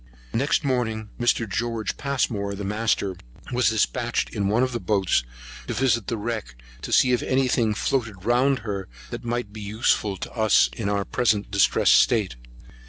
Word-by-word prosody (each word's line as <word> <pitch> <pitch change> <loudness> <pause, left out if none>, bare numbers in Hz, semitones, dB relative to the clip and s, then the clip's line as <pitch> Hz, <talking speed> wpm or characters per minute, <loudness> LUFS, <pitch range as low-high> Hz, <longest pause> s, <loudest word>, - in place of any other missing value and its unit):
Next 140 +6 +1
morning 110 -5 -1
Mr. 120 -1 +1
George 115 +2 -2
Passmore, 110 -8 -1
the 100 - -6
master, 105 -2 -1 0.3
was 125 -2 +3
dispatched 120 +2 0
in 100 -3 -1
one 110 +5 +2
of 130 - 0
the 120 - -3
boats 95 - +1 0.4
to - - -3
visit 120 -5 +1
the 115 - -2
wreck, 110 - -4 0.3
to - - -6
see 125 - +5
if 125 - +2
any 130 0 +1
thing 115 -4 +1
floated 110 -7 -2
round 125 +3 +3
her 100 -3 -4 0.2
that - - -6
might 120 -3 -3
be 110 - -8
useful 105 -1 0
to - - -7
us 110 -2 +3
in 105 -3 -2
our 100 -1 0
present 110 -5 0
distressed 100 -1 +4
state. 105 - +2
110 Hz, 170 wpm, -24 LUFS, 100-120 Hz, 0.4 s, see